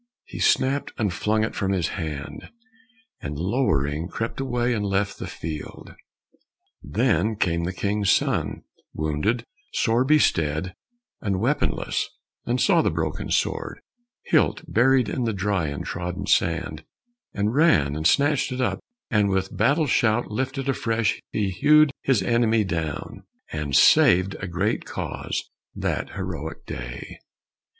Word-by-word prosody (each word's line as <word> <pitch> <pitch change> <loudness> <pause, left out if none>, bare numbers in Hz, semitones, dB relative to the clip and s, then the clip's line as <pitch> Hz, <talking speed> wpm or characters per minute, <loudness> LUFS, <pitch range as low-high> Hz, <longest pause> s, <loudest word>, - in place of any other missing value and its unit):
he - - -9
snapt 135 +2 +2
and 105 -6 0
flung 110 +4 +1
it 110 - -2
from 95 -1 -1
his 90 -3 0
hand, 75 -4 -6 0.7
And 70 0 -5
lowering 80 - 0
crept 115 +6 -4
away 125 -2 0
and 105 -3 -1
left 100 0 -1
the - - -5
field. 80 -2 -7 0.9
Then 110 - +1
came 85 -4 0
the 90 - -2
king's 100 +1 -1
son, - - +1 0.3
wounded, 80 +11 -1 0.3
sore 115 +2 +2
bestead, 90 - +2 0.5
And 95 -3 -1
weaponless, 135 +8 0 0.4
and - - +1
saw - - +4
the - - +2
broken - - -3
sword, - - -1 0.4
Hilt - - +2
buried 125 +1 +3
in 125 +3 -2
the 115 - 0
dry 95 -4 0
and 70 -1 -4
trodden 90 +2 -4
sand, 85 -5 0 0.5
And 105 +2 0
ran 130 - +3
and 80 +1 +2
snatched 145 - +2
it, 125 0 -1 0.3
and 105 -3 +3
with 95 0 -1
battle 140 - +3
shout 120 -3 +1
Lifted 130 +4 -2
afresh 115 -4 0
he 100 -3 -1
hewed 150 +8 +5
his 125 -8 +2
enemy 115 +1 +2
down, 80 -6 -4 0.3
And 75 -3 -2
saved 95 +2 +5
a 95 - -4
great 95 +6 -1
cause - - -4 0.3
that - - -2
heroic 80 +3 -5
day. - - -7
100 Hz, 135 wpm, -24 LUFS, 85-120 Hz, 0.9 s, hewed